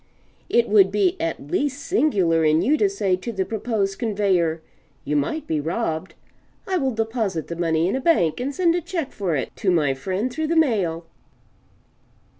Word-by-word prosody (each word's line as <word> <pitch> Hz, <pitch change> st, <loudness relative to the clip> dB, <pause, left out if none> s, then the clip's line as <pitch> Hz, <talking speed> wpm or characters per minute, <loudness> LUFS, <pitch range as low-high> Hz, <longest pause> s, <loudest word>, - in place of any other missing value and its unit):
It 235 Hz, 0 st, +3 dB
would 200 Hz, -2 st, +5 dB
be 200 Hz, -3 st, +2 dB
at 160 Hz, -3 st, -4 dB
least 285 Hz, 0 st, -1 dB
singular 190 Hz, -, +2 dB
in 155 Hz, +1 st, +3 dB
you 295 Hz, -, +3 dB
to 400 Hz, +5 st, +2 dB
say 200 Hz, -, 0 dB
to 235 Hz, +6 st, -5 dB
the 190 Hz, -4 st, -2 dB
proposed 215 Hz, -3 st, -2 dB
conveyor, 195 Hz, -7 st, +1 dB, 0.5 s
"You 150 Hz, -, -1 dB
might 150 Hz, -, -1 dB
be 155 Hz, -, -1 dB
robbed; 160 Hz, +1 st, -3 dB, 0.5 s
I 380 Hz, -1 st, +1 dB
will 270 Hz, -5 st, 0 dB
deposit 220 Hz, -, -2 dB
the 170 Hz, -, -4 dB
money 165 Hz, -1 st, +1 dB
in 190 Hz, -, 0 dB
a 265 Hz, -, -2 dB
bank 255 Hz, -, +2 dB
and 260 Hz, +3 st, -2 dB
send 335 Hz, +3 st, +2 dB
a 350 Hz, -, 0 dB
check 335 Hz, -4 st, -4 dB
for 185 Hz, -6 st, -2 dB
it 135 Hz, -, -4 dB
to 195 Hz, -, 0 dB
my 155 Hz, -6 st, +2 dB
friend 190 Hz, -, -3 dB
through 315 Hz, +2 st, -2 dB
the 335 Hz, -, 0 dB
mail." 195 Hz, -, +1 dB
200 Hz, 185 wpm, -23 LUFS, 165-265 Hz, 0.5 s, would